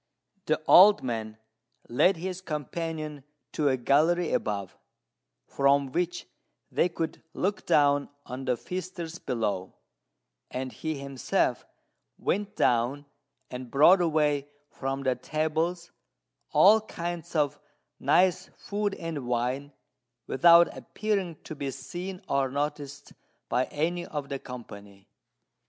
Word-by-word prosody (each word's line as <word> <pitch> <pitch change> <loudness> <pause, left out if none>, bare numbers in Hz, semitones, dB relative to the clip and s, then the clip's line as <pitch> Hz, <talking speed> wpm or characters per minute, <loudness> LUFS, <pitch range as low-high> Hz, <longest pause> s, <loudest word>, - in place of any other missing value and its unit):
The 155 - +2
old 205 +3 +8
man 110 -3 -4 0.5
led 180 +10 +3
his 185 +2 -5
companion 155 -2 -4 0.3
to 150 -2 +1
a 130 - +1
gallery 160 +7 +2
above, 100 -3 -2 0.7
from 140 -1 +2
which 175 +3 -2 0.5
they 180 - +2
could 165 -2 -4
look 200 +2 -2
down 145 -1 +3 0.2
on 130 +2 -6
the 125 -2 +1
feasters 180 - -6
below; 105 -6 -2 0.7
and 130 0 -4
he 155 +2 -4
himself 140 -2 -1 0.5
went 205 +1 -2
down 125 +5 +1 0.5
and 125 -1 -6
brought 170 +8 +6
away 150 -4 +1 0.2
from 135 0 -3
the 130 -1 +2
tables 160 +6 -2 0.6
all 215 +3 +6
kinds 170 -4 -6
of 145 -1 +1 0.4
nice 185 0 +3
food 205 0 -2
and 160 -7 -5
wine, 125 +4 -1 0.5
without 170 +5 +6
appearing 200 -6 -2
to - - -7
be 140 -2 -4
seen 175 +8 -7
or 135 -1 +1
noticed 145 0 -4 0.4
by 125 +2 +2
any 175 +4 -2
of 145 -2 -5
the 140 - -3
company. 100 -6 -11
150 Hz, 115 wpm, -28 LUFS, 130-175 Hz, 0.7 s, old